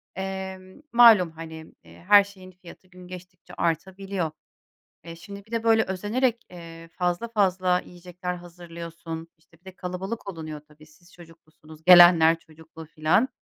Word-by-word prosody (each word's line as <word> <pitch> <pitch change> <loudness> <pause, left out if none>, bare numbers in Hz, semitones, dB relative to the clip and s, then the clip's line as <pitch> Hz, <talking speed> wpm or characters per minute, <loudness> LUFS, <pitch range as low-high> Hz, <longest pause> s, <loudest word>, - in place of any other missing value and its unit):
emm, 190 +3 -7
malum 225 -8 +7
hani, 160 0 -11
eee, - - -17
her 205 -1 +8
şeyin 190 -2 -14
fiyatı 185 0 -16
gün 180 -1 -15
geçtikçe 180 0 -13
artabiliyor. 185 +1 -3 0.7
E, 165 0 -9
şimdi 200 +4 -11
bir 220 - -23
de 230 -1 -2
böyle 225 -1 +4
özenerek, 230 +6 -2
eee, 165 -2 -12
fazla 175 +5 -2
fazla 185 -5 +1
yiyecekler 180 0 -7
hazırlıyorsun. 170 -1 -9
İşte, 165 0 -27
bir 180 - -43
de 190 - -9
kalabalık 190 +4 -6
olunuyor 155 -3 -8
tabii. 155 0 -19
Siz 170 +3 -23
çocuklusunuz, 160 -2 -17
gelenler 175 -2 +7
çocuklu 160 0 -14
filan. 160 - +1
180 Hz, 145 wpm, -25 LUFS, 165-190 Hz, 0.7 s, her